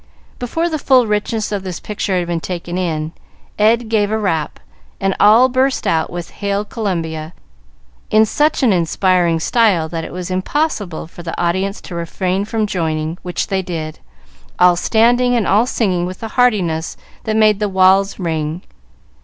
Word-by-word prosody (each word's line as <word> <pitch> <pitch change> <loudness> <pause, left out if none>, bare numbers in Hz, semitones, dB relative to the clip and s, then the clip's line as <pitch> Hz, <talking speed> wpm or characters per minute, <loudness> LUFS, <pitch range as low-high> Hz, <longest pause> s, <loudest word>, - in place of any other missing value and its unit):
Before 325 +8 -1
the 315 -2 -2
full 260 -3 +4
richness 210 +1 -1
of 205 -2 -2
this 185 -3 -6
picture 200 -2 -2
had 175 - 0
been 170 -1 -2
taken 175 0 -5
in, 160 -4 -2 0.5
Ed 225 +2 +3
gave 215 -2 +1
a 220 - 0
rap, 165 -8 -2 0.4
and 195 0 0
all 220 +5 +6
burst 260 +1 0
out 160 -1 +1
with 175 0 -6
"Hail 200 0 -2
Columbia," 165 -7 -3 0.8
in 215 +1 +5
such 295 +6 +1
an 230 -6 +4
inspiring 175 -1 +2
style 195 -4 +2
that 165 -1 -4
it - - -7
was 180 0 -5
impossible 195 - -2
for 170 +2 -12
the 170 -1 -5
audience 190 +4 -1
to - - -10
refrain 180 +3 -2
from 220 0 -1
joining, 160 -3 -2
which 180 -1 -3
they 195 -1 -1
did, 160 -4 -5 0.6
all 180 0 +5
standing 240 +6 +3
and 230 -4 +1
all 215 +5 +3
singing 185 -8 0
with 185 +4 -8
a 225 - -4
heartiness 190 -10 +1 0.3
that 215 - -1
made 215 -2 +4
the 210 -1 0
walls 190 +1 +3
ring. 160 -1 -3
190 Hz, 170 wpm, -17 LUFS, 170-220 Hz, 0.8 s, all